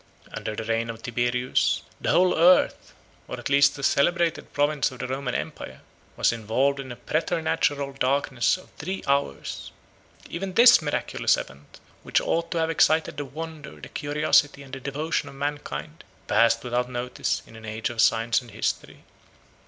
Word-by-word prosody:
Under 110 Hz, -, -4 dB
the 110 Hz, -, -4 dB
reign 115 Hz, +1 st, -1 dB
of 115 Hz, 0 st, -7 dB
Tiberius, 120 Hz, +1 st, 0 dB, 0.2 s
the -, -, -2 dB
whole 180 Hz, 0 st, +4 dB
earth, 175 Hz, +3 st, +4 dB, 0.4 s
194 -, -, -5 dB
or -, -, -8 dB
at -, -, -5 dB
least 140 Hz, 0 st, +4 dB
a 140 Hz, -, -8 dB
celebrated 170 Hz, +4 st, +1 dB
province 145 Hz, 0 st, +1 dB
of 130 Hz, -, -11 dB
the 125 Hz, -, -4 dB
Roman 130 Hz, -1 st, -3 dB
empire, 65 Hz, 0 st, -6 dB, 0.3 s
195 -, -, -31 dB
was -, -, +3 dB
involved 120 Hz, +5 st, 0 dB
in 130 Hz, -2 st, -6 dB
a -, -, -6 dB
preternatural 155 Hz, -3 st, -1 dB
darkness 135 Hz, 0 st, +1 dB
of 185 Hz, -, -17 dB
three 185 Hz, +6 st, -4 dB
hours. 140 Hz, -, -2 dB, 0.6 s
Even 190 Hz, +2 st, -5 dB
this 235 Hz, -4 st, +8 dB
miraculous 145 Hz, -2 st, 0 dB
event, 70 Hz, +2 st, -10 dB, 0.2 s
which -, -, +1 dB
ought 170 Hz, 0 st, -1 dB
to 170 Hz, -, -3 dB
have 165 Hz, 0 st, +1 dB
excited 160 Hz, -1 st, +2 dB
the 145 Hz, -, -3 dB
wonder, 155 Hz, +1 st, -8 dB
the -, -, -10 dB
curiosity, 145 Hz, -1 st, +1 dB
and 135 Hz, -1 st, -15 dB
the 135 Hz, -, -5 dB
devotion 145 Hz, +4 st, -2 dB
of -, -, -13 dB
mankind, 145 Hz, +3 st, -5 dB, 0.2 s
passed 115 Hz, 0 st, +3 dB
without 125 Hz, 0 st, -1 dB
notice 125 Hz, 0 st, -2 dB
in 115 Hz, -, -16 dB
an 110 Hz, -, -12 dB
age 110 Hz, +2 st, -3 dB
of 115 Hz, -2 st, 0 dB
science 115 Hz, +2 st, +3 dB
and 120 Hz, -, -14 dB
history. -, -, -4 dB
140 Hz, 175 wpm, -25 LUFS, 120-155 Hz, 0.6 s, this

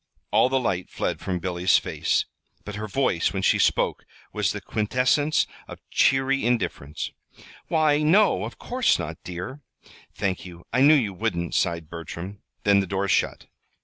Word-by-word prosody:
All 125 Hz, -, +4 dB
the 135 Hz, 0 st, +2 dB
light 95 Hz, -7 st, -2 dB
fled -, -, -2 dB
from 95 Hz, -2 st, -2 dB
Billy's 90 Hz, +1 st, +2 dB
face, -, -, 0 dB, 0.4 s
but 105 Hz, -, -6 dB
her 105 Hz, +1 st, -5 dB
voice, 115 Hz, -7 st, +1 dB
when -, -, -2 dB
she -, -, +3 dB
spoke, -, -, +1 dB, 0.3 s
was -, -, +1 dB
the -, -, -4 dB
quintessence 125 Hz, +7 st, +1 dB, 0.2 s
of -, -, -9 dB
cheery 135 Hz, +1 st, +3 dB
indifference. 110 Hz, -, -2 dB, 0.6 s
"Why, 155 Hz, -2 st, +3 dB
no, 190 Hz, +8 st, +4 dB
of -, -, -8 dB
course 250 Hz, 0 st, +1 dB
not, 80 Hz, +1 st, -6 dB
dear." 90 Hz, +11 st, -6 dB, 0.5 s
"Thank 95 Hz, -2 st, -2 dB
you. 85 Hz, -2 st, -11 dB
I 130 Hz, -, +3 dB
knew 150 Hz, +3 st, +7 dB
you 110 Hz, -9 st, +1 dB
wouldn't," 85 Hz, -1 st, -2 dB
sighed 85 Hz, -3 st, 0 dB
Bertram. 85 Hz, +4 st, -8 dB, 0.2 s
Then 100 Hz, -1 st, +5 dB
the 95 Hz, -, -1 dB
door 100 Hz, +1 st, -1 dB
shut. 85 Hz, -, 0 dB
100 Hz, 160 wpm, -25 LUFS, 90-135 Hz, 0.6 s, knew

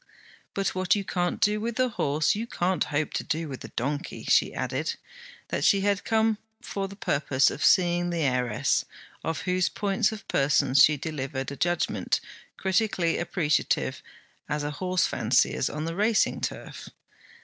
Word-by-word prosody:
'But 195 Hz, -1 st, +1 dB
what 185 Hz, +1 st, +1 dB
you 200 Hz, -, -2 dB
can't 175 Hz, -2 st, -1 dB
do 210 Hz, +1 st, +2 dB
with 235 Hz, +2 st, -3 dB
a 255 Hz, 0 st, +3 dB
horse, 150 Hz, -7 st, +1 dB
you 225 Hz, +3 st, -4 dB
can't 185 Hz, -4 st, 0 dB
hope 150 Hz, +1 st, -2 dB
to -, -, -1 dB
do 160 Hz, +1 st, -2 dB
with 135 Hz, -3 st, -7 dB
a -, -, -7 dB
donkey.' 145 Hz, +4 st, -4 dB
She -, -, +3 dB
added -, -, -2 dB, 0.5 s
that -, -, -2 dB
she 200 Hz, -2 st, +4 dB
had 200 Hz, 0 st, +1 dB
come 220 Hz, -1 st, +2 dB, 0.2 s
for 195 Hz, -1 st, -4 dB
the 200 Hz, -, -10 dB
purpose 140 Hz, -7 st, +2 dB
of -, -, -5 dB
seeing 175 Hz, -1 st, +4 dB
the 170 Hz, -2 st, -1 dB
heiress, 125 Hz, -5 st, +1 dB, 0.4 s
of 160 Hz, -2 st, -2 dB
whose 180 Hz, -1 st, +1 dB
points 200 Hz, +1 st, 0 dB
of 210 Hz, -2 st, -9 dB
person 140 Hz, -1 st, +2 dB
she 145 Hz, +2 st, +6 dB
delivered 135 Hz, -3 st, -4 dB
a -, -, -5 dB
judgement 175 Hz, +5 st, 0 dB, 0.4 s
critically 190 Hz, -3 st, +1 dB
appreciative 170 Hz, -3 st, 0 dB, 0.5 s
as 150 Hz, 0 st, -1 dB
a 145 Hz, -, -2 dB
horsefancier's 185 Hz, +4 st, +1 dB
on 150 Hz, +1 st, -4 dB
the 165 Hz, -, -3 dB
racing 215 Hz, +3 st, +2 dB
turf. -, -, -6 dB
175 Hz, 160 wpm, -27 LUFS, 145-200 Hz, 0.5 s, she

